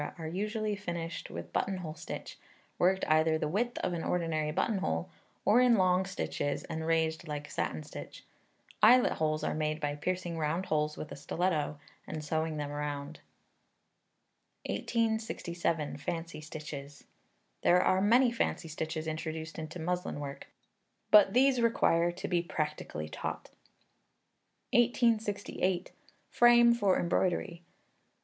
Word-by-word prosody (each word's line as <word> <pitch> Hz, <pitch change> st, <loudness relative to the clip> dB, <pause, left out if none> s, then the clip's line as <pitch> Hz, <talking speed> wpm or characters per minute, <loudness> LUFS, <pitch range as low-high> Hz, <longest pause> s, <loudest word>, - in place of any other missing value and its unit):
are 165 Hz, -, -6 dB
usually 210 Hz, +4 st, -2 dB
finished 170 Hz, -4 st, -5 dB
with -, -, -8 dB
buttonhole 185 Hz, -5 st, -2 dB
stitch, 160 Hz, -, -8 dB, 0.4 s
worked 190 Hz, +2 st, +3 dB
either 160 Hz, +1 st, +4 dB
the 155 Hz, -, -1 dB
width 235 Hz, +9 st, -1 dB
of 180 Hz, -, 0 dB
an 170 Hz, -, -3 dB
ordinary 160 Hz, -3 st, 0 dB
buttonhole, 150 Hz, -, -1 dB, 0.3 s
or 225 Hz, +4 st, +6 dB
in 250 Hz, -2 st, +6 dB
long 185 Hz, -1 st, +3 dB
stitches, 145 Hz, -6 st, -2 dB
and 160 Hz, 0 st, -4 dB
raised 160 Hz, 0 st, +1 dB
like 145 Hz, -1 st, -5 dB
satin 80 Hz, -, -2 dB
stitch. -, -, -9 dB, 0.6 s
Eyelet 245 Hz, +3 st, +7 dB
holes 155 Hz, -1 st, 0 dB
are -, -, 0 dB
made 155 Hz, 0 st, -1 dB
by 145 Hz, -1 st, -1 dB
piercing 175 Hz, +2 st, -3 dB
round 160 Hz, +4 st, -1 dB
holes 150 Hz, -2 st, 0 dB
with 155 Hz, -, -7 dB
a -, -, -5 dB
stiletto, 150 Hz, 0 st, -1 dB, 0.3 s
and 155 Hz, -1 st, -5 dB
sewing 160 Hz, 0 st, -1 dB
them 145 Hz, -1 st, -3 dB
round. 145 Hz, +1 st, -4 dB, 1.5 s
1867. 220 Hz, -9 st, -1 dB
Fancy 165 Hz, +1 st, -5 dB
Stitches. 150 Hz, -2 st, -8 dB, 0.6 s
There 180 Hz, -, +5 dB
are 185 Hz, 0 st, +3 dB
many 240 Hz, +5 st, +5 dB
fancy 210 Hz, -7 st, -1 dB
stitches 160 Hz, +1 st, -4 dB
introduced 160 Hz, 0 st, -4 dB
into 160 Hz, +2 st, -6 dB
muslin 180 Hz, -1 st, -2 dB
work, 140 Hz, -1 st, -7 dB, 0.6 s
but 205 Hz, -2 st, +7 dB
these 255 Hz, 0 st, +4 dB
require 175 Hz, -7 st, +3 dB
to 175 Hz, -, -6 dB
be 175 Hz, -2 st, +1 dB
practically 150 Hz, -, -4 dB
taught. -, -, -5 dB, 1.2 s
1868. 215 Hz, -6 st, +1 dB, 0.4 s
Frame 240 Hz, 0 st, +6 dB
for 205 Hz, -5 st, +2 dB
Embroidery. 175 Hz, 0 st, 0 dB
170 Hz, 130 wpm, -31 LUFS, 155-195 Hz, 1.5 s, Eyelet